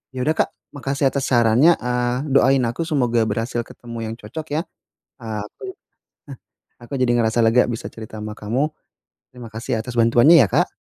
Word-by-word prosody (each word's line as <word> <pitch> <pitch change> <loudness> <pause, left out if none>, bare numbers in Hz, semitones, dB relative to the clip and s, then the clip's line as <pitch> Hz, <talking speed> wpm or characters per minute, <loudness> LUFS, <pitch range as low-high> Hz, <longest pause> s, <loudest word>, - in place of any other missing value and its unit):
Ya 125 - -2
udah, 155 +3 0
Kak, - - 0 0.2
makasih 135 -1 -1
atas 140 -1 -2
sarannya, 120 +7 +4
eee, 125 +3 -2
doain 135 -1 +4
aku 120 +8 -2
semoga 120 -7 +1
berhasil 115 +3 -2
ketemu 115 -2 -8
yang 110 - -5
cocok 120 +8 -8
ya. 160 - +1 0.6
Eee, 110 -3 -5
aku 105 - -14
eh, 380 - -8 1.1
aku 120 - -15
jadi 120 -1 +2
ngerasa 115 -1 +1
lega 115 +2 +4
bisa 115 - -5
cerita 110 -1 -9
sama 105 0 -6
kamu. 120 +8 -1 0.6
Terima 125 -2 -11
kasih 115 +1 -4
atas 120 +3 -6
bantuannya 120 +7 +6
ya, 100 - 0
Kak. - - +1
120 Hz, 175 wpm, -21 LUFS, 115-135 Hz, 1.1 s, bantuannya